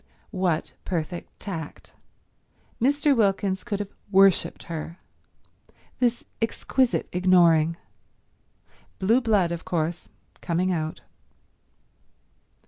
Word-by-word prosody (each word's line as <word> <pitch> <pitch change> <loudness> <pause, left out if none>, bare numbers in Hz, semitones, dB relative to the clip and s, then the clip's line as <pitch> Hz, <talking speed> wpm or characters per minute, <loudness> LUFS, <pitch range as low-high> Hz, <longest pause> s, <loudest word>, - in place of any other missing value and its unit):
What 180 -5 -1
perfect 175 -1 -4
tact. 165 -7 -7 0.9
Mr. 285 +2 +3
Wilkins 195 -3 +1
could 210 -4 -3
have 205 -1 -5 0.2
worshipped 195 -1 +4
her. 165 +1 -6 1.0
This 240 -1 +1 0.2
exquisite 250 +2 0
ignoring. 170 -3 +4 1.2
Blue 225 +7 +3
blood, 205 -7 +2
of 170 0 -4
course, 170 0 -2 0.3
coming 180 +2 0
out. 160 -2 -3
185 Hz, 85 wpm, -25 LUFS, 170-210 Hz, 1.2 s, worshipped